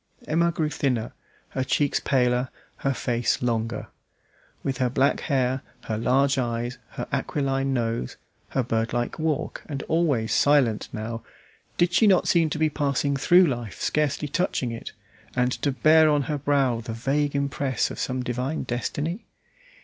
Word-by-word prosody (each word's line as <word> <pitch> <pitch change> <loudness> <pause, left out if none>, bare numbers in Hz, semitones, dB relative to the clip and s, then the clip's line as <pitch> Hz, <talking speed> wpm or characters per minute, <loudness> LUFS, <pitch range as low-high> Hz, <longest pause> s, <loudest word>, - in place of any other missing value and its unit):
Emma 170 +2 +2
grew 160 -2 -1
thinner, 125 -6 -1 0.4
her 130 - -2
cheeks 145 +2 +1
paler, 125 -1 +1 0.3
her 135 - 0
face 120 -2 0
longer. 115 -1 -1 0.8
With 135 -1 -2
her 125 -1 +2
black 135 +3 +2
hair, 130 -1 0 0.2
her 110 - -3
large 135 +4 +2
eyes, 120 0 -2
her - - -5
aquiline 135 -1 0
nose, 115 - -2 0.3
her 130 - 0
birdlike 120 +3 -1
walk, 155 -2 -1
and 140 -2 -4
always 150 -9 +1
silent 135 -7 +3
now, 115 +1 -5 0.6
did 175 0 +2
she 220 - +5
not 190 -3 +4
seem 165 -2 +3
to - - -3
be 155 0 +3
passing 140 -2 0
through 175 +6 +5
life 120 - -3
scarcely 150 0 0
touching 145 -6 -1
it, 115 - -7 0.4
and 125 0 +2
to 145 - +1
bear 155 +3 +5
on 145 -1 +2
her 150 +1 -2
brow 135 -4 +2
the 115 0 -6
vague 140 +5 0
impress 140 -1 0
of - - -7
some 130 -1 -2
divine 125 +5 -2
destiny? 145 - -3
135 Hz, 155 wpm, -25 LUFS, 120-150 Hz, 0.8 s, she